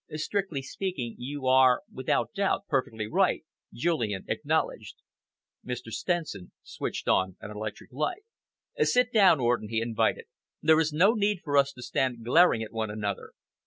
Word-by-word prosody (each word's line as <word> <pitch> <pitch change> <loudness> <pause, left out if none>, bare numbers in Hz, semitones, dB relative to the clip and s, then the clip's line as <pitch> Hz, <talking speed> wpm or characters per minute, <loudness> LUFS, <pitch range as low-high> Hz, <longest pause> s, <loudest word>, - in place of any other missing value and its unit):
"Strictly 155 -1 -2
speaking, 135 -7 -4
you 140 +2 -5
are, 130 -1 +5
without 130 - -1
doubt, 200 -1 0
perfectly 115 -6 -1
right," 105 - +1 0.3
Julian 120 - -1
acknowledged. - - -1 0.7
Mr. 125 -2 -6
Stenson 155 - -3
switched - - -5
on 95 -1 +2
an 105 - -8
electric 105 +3 -7
light. 150 - -2 0.6
"Sit 250 - +3
down, 195 -8 +6
Orden," 120 -3 0
he 110 0 0
invited. 115 -1 0 0.3
"There 160 0 +4
is 160 -1 +1
no 180 +8 +5
need 205 -4 0
for 145 -3 -2
us 140 -1 +4
to 125 - -10
stand 125 -2 -1
glaring 125 -3 +5
at 110 - -9
one 110 -1 -2
another. 105 -2 -4
130 Hz, 150 wpm, -28 LUFS, 115-170 Hz, 0.7 s, down